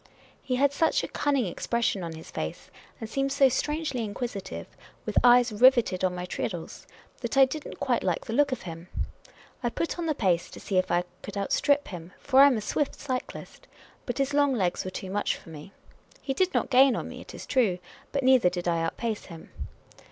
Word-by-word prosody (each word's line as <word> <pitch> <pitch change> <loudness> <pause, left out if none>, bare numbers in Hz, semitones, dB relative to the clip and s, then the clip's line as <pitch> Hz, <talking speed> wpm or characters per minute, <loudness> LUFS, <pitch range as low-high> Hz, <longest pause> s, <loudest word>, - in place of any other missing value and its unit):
He 255 - -2
had 280 +2 +3
such 320 +2 +2
a - - -2
cunning 280 -5 0
ex 175 - -6
pression 235 -4 +1
on 165 -1 -5
his 160 - -11
face, 80 - -5 0.3
and 225 - -5
seemed 275 +4 -1
so 275 -1 +5
strangely 295 -1 -1
inquisitive, 210 -1 -5 0.4
with - - -4
eyes 245 -1 +6
riveted 230 -4 +4
on 185 -1 +1
my 180 0 -4
treadles, 175 -2 -5 0.3
that 235 +1 -3
I 270 - +9
did 290 +3 -6
n't - - -10
quite 255 -4 +1
like 180 -3 -1
the 225 - -4
look 285 +2 +3
of 255 - -3
him. 165 0 -8 0.7
I 240 - 0
put 335 +8 -3
on 335 - -2
the 310 - +1
pace, 180 -7 +1
to - - -11
see 195 - -2
if 185 - -1
I 175 0 +2 0.2
could 205 - -7
outstrip 285 +8 +1
him, 175 -1 -9
for 265 -1 +3
I 280 - +10
am 265 -4 +2
a - - -3
swift 285 +6 -1
cyclist. 255 -3 -6 0.4
But 245 - -3
his 275 0 0
long 285 -2 +3
legs 185 -6 0
were 185 - -4
too 185 0 -6
much 205 +1 0
for - - -15
me. 155 +3 -10 0.5
He 270 - -3
did 370 +6 +1
not - - -1
gain 260 -1 +6
on - - -4
me, - - -9
it - - -11
is - - -8
true; 225 -9 +2 0.3
but 275 -1 -1
neither 255 -7 +5
did 175 0 -4
I 170 -1 +1
outpace 215 +6 -3
him. 165 -3 -12
240 Hz, 220 wpm, -27 LUFS, 185-275 Hz, 0.7 s, I